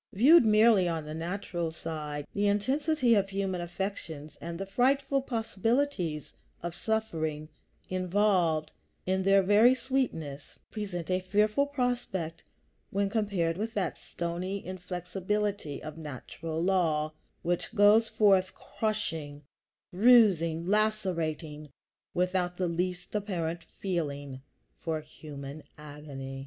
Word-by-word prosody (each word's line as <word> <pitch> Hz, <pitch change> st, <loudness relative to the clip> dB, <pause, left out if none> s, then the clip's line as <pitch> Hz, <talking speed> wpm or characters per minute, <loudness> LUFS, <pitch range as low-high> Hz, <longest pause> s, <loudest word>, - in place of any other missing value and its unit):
Viewed 260 Hz, -, +7 dB
merely 215 Hz, -3 st, +5 dB
on 165 Hz, -2 st, -2 dB
the 155 Hz, -, -6 dB
natural 175 Hz, 0 st, -3 dB
side, 150 Hz, -3 st, -5 dB
the 205 Hz, 0 st, +1 dB
intensity 260 Hz, +5 st, +2 dB
of 200 Hz, -2 st, +2 dB
human 195 Hz, -2 st, -2 dB
affections 170 Hz, -4 st, -5 dB
and 170 Hz, 0 st, -5 dB
the 195 Hz, -, -3 dB
frightful 270 Hz, +6 st, +2 dB
possibilities 225 Hz, -, -1 dB, 0.3 s
of 170 Hz, -1 st, -3 dB
suffering 160 Hz, -8 st, -2 dB, 0.4 s
involved 185 Hz, -4 st, +1 dB, 0.3 s
in 190 Hz, +1 st, +1 dB
their 195 Hz, +1 st, +5 dB
very 215 Hz, +6 st, +6 dB
sweetness 225 Hz, -, -3 dB
present 185 Hz, -5 st, -4 dB
a 185 Hz, -, +2 dB
fearful 210 Hz, +8 st, +2 dB
prospect 245 Hz, -, -2 dB, 0.5 s
when 200 Hz, 0 st, 0 dB
compared 200 Hz, -7 st, 0 dB
with 225 Hz, +3 st, -3 dB
that 200 Hz, -3 st, 0 dB
stony 180 Hz, +3 st, -4 dB
inflexibility 185 Hz, -1 st, -3 dB
of 155 Hz, +1 st, -7 dB
natural 160 Hz, +2 st, -6 dB
law, 165 Hz, -4 st, +1 dB, 0.3 s
which 175 Hz, 0 st, -1 dB
goes 215 Hz, +2 st, +6 dB
forth 190 Hz, -3 st, +3 dB
crushing, 170 Hz, -9 st, -3 dB, 0.5 s
bruising, 185 Hz, -7 st, +5 dB
lacerating, 175 Hz, -8 st, -1 dB, 0.5 s
without 180 Hz, 0 st, 0 dB
the 185 Hz, -, 0 dB
least 180 Hz, +1 st, -2 dB
apparent 175 Hz, -5 st, -2 dB
feeling 145 Hz, -7 st, -3 dB, 0.4 s
for 160 Hz, -2 st, -2 dB
human 150 Hz, -1 st, -9 dB, 0.2 s
agony. 145 Hz, -3 st, -8 dB
185 Hz, 110 wpm, -29 LUFS, 160-210 Hz, 0.5 s, Viewed